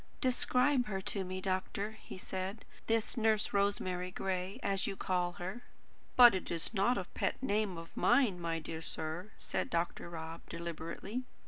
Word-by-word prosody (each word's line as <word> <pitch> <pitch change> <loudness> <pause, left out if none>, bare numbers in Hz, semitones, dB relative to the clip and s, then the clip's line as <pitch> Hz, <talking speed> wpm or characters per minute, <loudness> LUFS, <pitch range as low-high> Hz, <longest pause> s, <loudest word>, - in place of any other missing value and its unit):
"Describe 255 0 +3
her 195 -2 -2
to 190 +1 -1
me, 185 0 -4
doctor," 190 +2 -1
he 220 - -10
said; 190 +3 -4 0.2
"this 225 +2 +1
Nurse 220 -2 +3
Rosemary 185 -3 +1
Gray, 185 +1 -2
as 195 -1 +1
you 200 - -2
call 180 -2 0
her." 185 +7 -5 0.5
"But 245 -3 +10
it 190 - -2
is 170 +5 -1
not 225 +5 +3
a 195 - -1
pet - - -1
name 210 -6 +1
of 165 0 -9
mine, 240 -7 +4
my 165 -1 -1
dear 160 0 -5
sir," 160 +5 -3
said - - -2
Dr. 170 0 -1
Rob 165 0 -6
deliberately. 170 +7 -4
190 Hz, 160 wpm, -34 LUFS, 175-215 Hz, 0.5 s, But